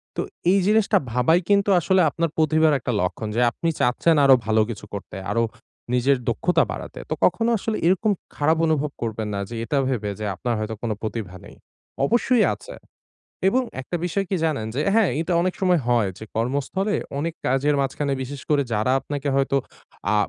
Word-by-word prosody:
তো -, -, -1 dB, 0.3 s
এই 195 Hz, -, +4 dB
জিনিসটা 215 Hz, 0 st, +3 dB
ভাবাই 125 Hz, +8 st, +3 dB
কিন্তু 200 Hz, 0 st, +3 dB
আসলে 190 Hz, +2 st, +3 dB
আপনার 165 Hz, +4 st, -1 dB
প্রতিভার 155 Hz, 0 st, +3 dB
একটা 125 Hz, -, -3 dB
লক্ষণ। 90 Hz, +4 st, -2 dB
যে 120 Hz, -, +2 dB
আপনি 165 Hz, -, -2 dB
চাচ্ছেন 140 Hz, +7 st, +3 dB
আরো 135 Hz, -1 st, +8 dB
ভালো 110 Hz, 0 st, +3 dB
কিছু 105 Hz, -2 st, -6 dB
করতে, 100 Hz, -2 st, -7 dB, 0.2 s
আরো 115 Hz, 0 st, +2 dB, 0.5 s
নিজের 130 Hz, +2 st, +3 dB
দক্ষতা 180 Hz, +9 st, +2 dB
বাড়াতে। -, -, -7 dB
তো -, -, 0 dB
কখনো 230 Hz, 0 st, +2 dB
আসলে 215 Hz, +2 st, -2 dB
এরকম 190 Hz, +4 st, +2 dB, 0.2 s
খারাপ 155 Hz, +2 st, +2 dB
অনুভব 150 Hz, -2 st, 0 dB
করবেন 110 Hz, -2 st, -3 dB
না 100 Hz, -, -2 dB
যে 120 Hz, -, -6 dB
এটা 140 Hz, +5 st, -1 dB
ভেবে 110 Hz, -6 st, -1 dB
যে 105 Hz, -, -3 dB
আপনার 120 Hz, +4 st, -2 dB
হয়তো 110 Hz, +1 st, -3 dB
কোন 115 Hz, -2 st, -2 dB
প্রতিভা 110 Hz, -4 st, -5 dB
নেই। -, -, -13 dB, 0.5 s
অবশ্যই 240 Hz, -, +3 dB
আছে। -, -, -11 dB, 0.7 s
এবং 255 Hz, +5 st, +2 dB, 0.2 s
একটা 175 Hz, -, -4 dB
বিষয় 195 Hz, +3 st, -1 dB
কি 190 Hz, -, +1 dB
জানেন? 140 Hz, -9 st, -1 dB
যে 140 Hz, -, -1 dB
হ্যাঁ, 220 Hz, -4 st, +4 dB
এটা 165 Hz, +2 st, -2 dB
অনেক 185 Hz, 0 st, 0 dB
সময় 180 Hz, -4 st, +3 dB
হয় 120 Hz, -4 st, +3 dB
যে 110 Hz, -, -8 dB
কর্মস্থলে 140 Hz, -, -1 dB, 0.2 s
অনেক 165 Hz, +2 st, -2 dB
কাজের 135 Hz, +3 st, +2 dB
মাঝখানে 140 Hz, +1 st, -1 dB
বিশেষ 140 Hz, +2 st, -6 dB
করে 145 Hz, -2 st, +4 dB
যারা 110 Hz, +4 st, +1 dB
আপনাকে 145 Hz, 0 st, -4 dB
হয়তো 135 Hz, 0 st, +1 dB, 0.6 s
আ -, -, +3 dB
145 Hz, 185 wpm, -23 LUFS, 120-180 Hz, 0.7 s, আরো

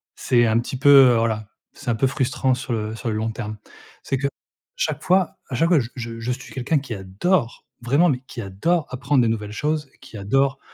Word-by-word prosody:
c'est 120 Hz, -1 st, +2 dB
un 110 Hz, +1 st, +3 dB
petit 125 Hz, +2 st, -4 dB
peu, 140 Hz, +2 st, +3 dB, 0.2 s
heu, -, -, +2 dB
voilà 110 Hz, -2 st, -1 dB, 0.3 s
c'est -, -, -5 dB
un 115 Hz, -, +2 dB
peu 135 Hz, +4 st, +2 dB
frustrant 130 Hz, -1 st, 0 dB
sur 125 Hz, 0 st, -6 dB
le 110 Hz, 0 st, -3 dB
sur 115 Hz, 0 st, -4 dB
le 105 Hz, -, -1 dB
long 110 Hz, +1 st, -1 dB
terme. 110 Hz, -1 st, -6 dB, 0.5 s
C'est 135 Hz, -, -1 dB
que 140 Hz, +2 st, 0 dB, 0.5 s
chaque -, -, -2 dB
fois 185 Hz, -1 st, +2 dB
à 130 Hz, -, -3 dB
chaque 165 Hz, +7 st, +2 dB
fois, 170 Hz, -5 st, +5 dB
j 115 Hz, -, -3 dB
je 115 Hz, -2 st, -6 dB
je 115 Hz, +2 st, -2 dB
suis 130 Hz, +2 st, -7 dB
quelqu'un 135 Hz, +4 st, 0 dB
qui 130 Hz, -4 st, -7 dB
adore, 110 Hz, -, -1 dB, 0.2 s
vraiment, 140 Hz, +9 st, +3 dB
mais 125 Hz, -3 st, -1 dB
qui 120 Hz, -, -7 dB
adore 145 Hz, -, 0 dB
apprendre 130 Hz, +1 st, +1 dB
de 115 Hz, -, +2 dB
nouvelles 105 Hz, -2 st, -2 dB
choses, 150 Hz, +3 st, -2 dB
qui 130 Hz, -4 st, -11 dB
adore 135 Hz, +7 st, +1 dB
125 Hz, 225 wpm, -22 LUFS, 115-140 Hz, 0.5 s, fois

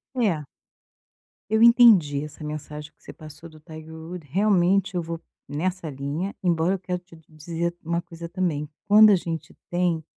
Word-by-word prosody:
É. 200 Hz, -12 st, +1 dB, 1.1 s
Eu 220 Hz, +1 st, +2 dB
entendi 220 Hz, -, +6 dB
essa 150 Hz, +1 st, -10 dB
mensagem 150 Hz, 0 st, -7 dB
que -, -, -33 dB
você -, -, -9 dB
passou 155 Hz, +2 st, -12 dB
do 155 Hz, -1 st, -16 dB
Tiger 160 Hz, 0 st, -11 dB
Woods, 160 Hz, -1 st, -9 dB
realmente 195 Hz, 0 st, +2 dB
eu 175 Hz, -, 0 dB
vou 165 Hz, 0 st, -6 dB, 0.3 s
nessa 170 Hz, +3 st, -3 dB
linha, 145 Hz, +8 st, -4 dB
embora 175 Hz, -1 st, +1 dB
eu -, -, -7 dB
quero 180 Hz, 0 st, -4 dB
te 175 Hz, -1 st, -18 dB
dizer 165 Hz, +2 st, -4 dB
uma 170 Hz, +1 st, -1 dB
coisa 170 Hz, 0 st, -10 dB
também, 165 Hz, -6 st, -2 dB, 0.2 s
quando 215 Hz, +1 st, +8 dB
a 205 Hz, -, +6 dB
gente 165 Hz, -2 st, -5 dB, 0.2 s
tem 175 Hz, -2 st, 0 dB
170 Hz, 165 wpm, -24 LUFS, 155-185 Hz, 1.1 s, quando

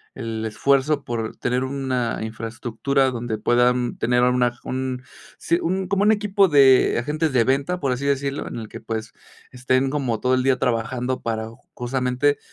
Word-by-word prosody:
el 115 Hz, -3 st, -4 dB
esfuerzo 140 Hz, +5 st, +1 dB
por 115 Hz, -2 st, -4 dB
tener 125 Hz, +1 st, -1 dB
una 130 Hz, -3 st, -2 dB
infraestructura, 120 Hz, +4 st, -1 dB
donde 120 Hz, -2 st, -3 dB
puedan 120 Hz, +2 st, +2 dB
tener 125 Hz, +1 st, +2 dB
una 125 Hz, -1 st, +2 dB
un 130 Hz, 0 st, -3 dB, 0.3 s
Sí, 170 Hz, +1 st, 0 dB
un 185 Hz, +2 st, -1 dB
como 200 Hz, 0 st, +1 dB
un 215 Hz, -, +5 dB
equipo 205 Hz, -2 st, +3 dB
de 135 Hz, -3 st, +5 dB
agentes 150 Hz, +3 st, -1 dB
de 120 Hz, -2 st, +4 dB
venta, 140 Hz, +7 st, 0 dB
por 135 Hz, -5 st, 0 dB
así 130 Hz, +3 st, -5 dB
decirlo, 140 Hz, 0 st, -1 dB
en -, -, -6 dB
el 110 Hz, -, -7 dB
que, -, -, -9 dB
pues, 110 Hz, 0 st, -5 dB, 0.4 s
estén 130 Hz, +1 st, +1 dB
como 130 Hz, -7 st, -1 dB
todo 130 Hz, +2 st, +1 dB
el 130 Hz, -, +1 dB
día 135 Hz, -1 st, +3 dB
trabajando 125 Hz, +1 st, -1 dB
para, 110 Hz, -1 st, -3 dB, 0.3 s
justamente, 125 Hz, +3 st, 0 dB
130 Hz, 170 wpm, -22 LUFS, 120-140 Hz, 0.4 s, un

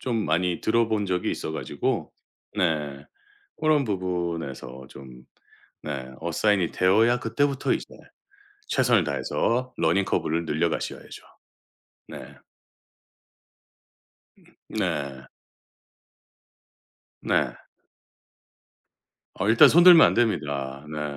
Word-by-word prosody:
좀 115 Hz, -4 st, -2 dB
많이 85 Hz, +3 st, 0 dB
들어 115 Hz, 0 st, +1 dB
본 105 Hz, -2 st, 0 dB
적이 90 Hz, -1 st, -1 dB
있어 80 Hz, -, -4 dB
가지고 -, -, -3 dB, 0.4 s
네. 75 Hz, -5 st, -1 dB, 0.6 s
그런 155 Hz, -3 st, +3 dB
부분에서 85 Hz, -, -4 dB
좀 65 Hz, -2 st, -13 dB, 0.6 s
네. 65 Hz, -1 st, -6 dB
어사인이 90 Hz, +2 st, 0 dB
되어야 110 Hz, +6 st, +3 dB
그때부터 140 Hz, +4 st, 0 dB
이제 -, -, -2 dB, 0.8 s
최선을 -, -, +2 dB
다해서 125 Hz, +2 st, -1 dB
러닝 90 Hz, +4 st, +1 dB
커브를 85 Hz, +1 st, -1 dB
늘려 80 Hz, +2 st, 0 dB
가셔야죠. -, -, -6 dB, 0.9 s
네. -, -, -10 dB, 2.3 s
네. 70 Hz, -2 st, -3 dB, 2.0 s
네. -, -, 0 dB, 1.8 s
어 100 Hz, -, -2 dB
일단 115 Hz, -, +7 dB
손 175 Hz, +2 st, +6 dB
들면 175 Hz, -2 st, +9 dB
안 -, -, 0 dB
됩니다. 70 Hz, -, -1 dB
네. 75 Hz, -2 st, -4 dB
85 Hz, 185 characters per minute, -25 LUFS, 75-115 Hz, 2.3 s, 들면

